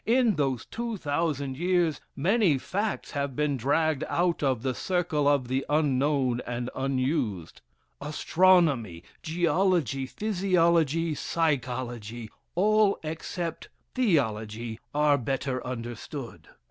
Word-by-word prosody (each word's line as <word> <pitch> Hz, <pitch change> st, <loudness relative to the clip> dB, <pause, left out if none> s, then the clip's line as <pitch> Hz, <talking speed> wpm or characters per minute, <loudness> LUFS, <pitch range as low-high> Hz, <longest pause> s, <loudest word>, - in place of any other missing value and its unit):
In 235 Hz, -1 st, +4 dB
those 135 Hz, -5 st, -1 dB
2000 155 Hz, -, -2 dB
years 175 Hz, -3 st, +1 dB
many 185 Hz, -, +3 dB
facts 200 Hz, +9 st, -3 dB
have 140 Hz, -3 st, -2 dB
been 150 Hz, 0 st, +1 dB
dragged 145 Hz, +4 st, +1 dB
out 175 Hz, 0 st, +1 dB
of 130 Hz, -5 st, 0 dB
"the 130 Hz, -1 st, 0 dB
circle 170 Hz, -3 st, 0 dB
of 140 Hz, -3 st, +2 dB
the 130 Hz, +2 st, 0 dB
unknown 140 Hz, -4 st, +1 dB
and 120 Hz, 0 st, -3 dB
unused." 130 Hz, -, -2 dB, 0.4 s
Astronomy, 150 Hz, -, +2 dB, 0.2 s
geology, 170 Hz, -, +1 dB
physiology, 170 Hz, -5 st, +1 dB
psychology 120 Hz, -8 st, -2 dB, 0.2 s
all 210 Hz, +2 st, +3 dB
except 165 Hz, +2 st, -5 dB, 0.2 s
theology 115 Hz, -, 0 dB
are 145 Hz, 0 st, +3 dB
belter 130 Hz, +1 st, -2 dB
understood. 120 Hz, +1 st, -7 dB
145 Hz, 100 wpm, -27 LUFS, 130-170 Hz, 0.4 s, In